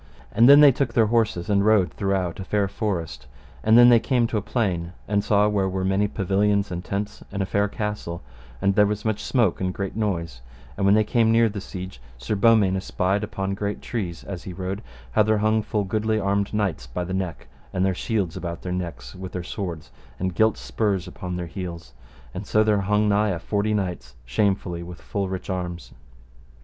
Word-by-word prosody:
And 115 +4 +5
then 145 +1 +9
they 145 -2 +9
took 125 -2 -1
their 115 - +5
horses 110 -6 +1
and 100 -1 +2
rode 105 -5 +3
throughout 95 -3 -1
a - - -4
fair 100 +1 0
forest; 90 - -4 0.4
and 110 +1 +5
then 120 0 +9
they 120 -1 +7
came 120 +1 +1
to 115 - -1
a - - 0
plain, 90 -6 -1
and 100 -1 +1
saw 105 0 +3
where 100 -2 +1
were 95 0 -2
many 95 +2 +2
pavilions 100 0 +1
and 90 0 -4
tents, 100 +2 -4
and 100 0 -1
a - - -2
fair 100 +2 +1
castle, 105 -5 -4 0.4
and 100 - +3
there 105 +1 +4
was 105 +1 -3
much 110 -2 -1
smoke 115 -10 +1
and 90 -1 -1
great 100 -1 -4
noise; 85 - -2 0.3
and 100 -1 +1
when 100 - +6
they 110 - +4
came 110 +1 +2
near 115 0 +4
the 100 -1 -6
siege 95 -8 -8 0.2
Sir 65 - -3
Beaumains 105 -3 +4
espied 95 +2 -1
upon 95 -1 -3
great 100 +1 -3
trees, 95 -9 -4
as 95 -3 -6
he 90 - -8
rode, 95 +2 -4 0.3
how 110 - +3
there 110 0 +3
hung 110 +1 +2
full 105 -1 -1
goodly 110 +3 0
armed 100 0 0
knights 100 -12 -1
by 90 +8 -4
the 90 +2 -5
neck, 95 -3 -3 0.3
and 95 +1 0
their 95 - +2
shields 95 -3 -2
about 85 0 -5
their 90 - -4
necks 85 -9 -5
with 95 0 -8
their 90 - -3
swords, 85 -4 -6 0.3
and 95 0 -2
gilt 110 +4 +3
spurs 90 - -1
upon 90 -1 -6
their 90 0 -3
heels, 85 -2 -7 0.4
and 95 +2 -6
so 110 - +3
there 105 -2 +2
hung 105 +2 +2
nigh 105 +1 +2
a 90 - -1
forty 105 +5 -1
knights 90 -10 -4
shamefully 90 - 0
with 85 0 -9
full 100 -2 -3
rich 95 0 -5
arms. 90 -2 -4
100 Hz, 210 wpm, -24 LUFS, 90-105 Hz, 0.4 s, then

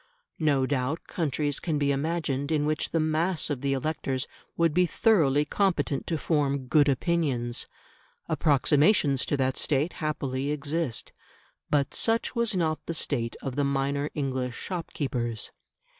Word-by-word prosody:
No 145 -4 +3
doubt 140 +3 -1
countries 145 -3 -1
can 160 -4 -1
be 145 -1 +2
imagined 145 -1 -1
in 150 -2 +2
which 155 0 0
the 165 - 0
mass 155 +1 +1
of 135 -4 -2
the 140 -1 +1
electors 135 -2 -2 0.3
would 165 -2 +3
be 180 +2 +4
thoroughly 150 - +3
competent 155 -5 0
to 165 - 0
form 140 -4 0
good 145 +3 +4
opinions; 135 -5 0 0.6
approximations 150 - +3
to 145 - +1
that 130 -1 0
state 150 +3 +1
happily 140 -3 -2
exist. 150 -2 -2 0.6
But 145 -1 +1
such 225 +2 +1
was 235 -3 +1
not 160 -3 0
the 165 - -2
state 120 -7 -1
of 130 -2 -3
the 145 - +1
minor 140 +1 0
English 130 -3 -2
shopkeepers. 130 - -3
145 Hz, 145 wpm, -27 LUFS, 135-160 Hz, 0.6 s, be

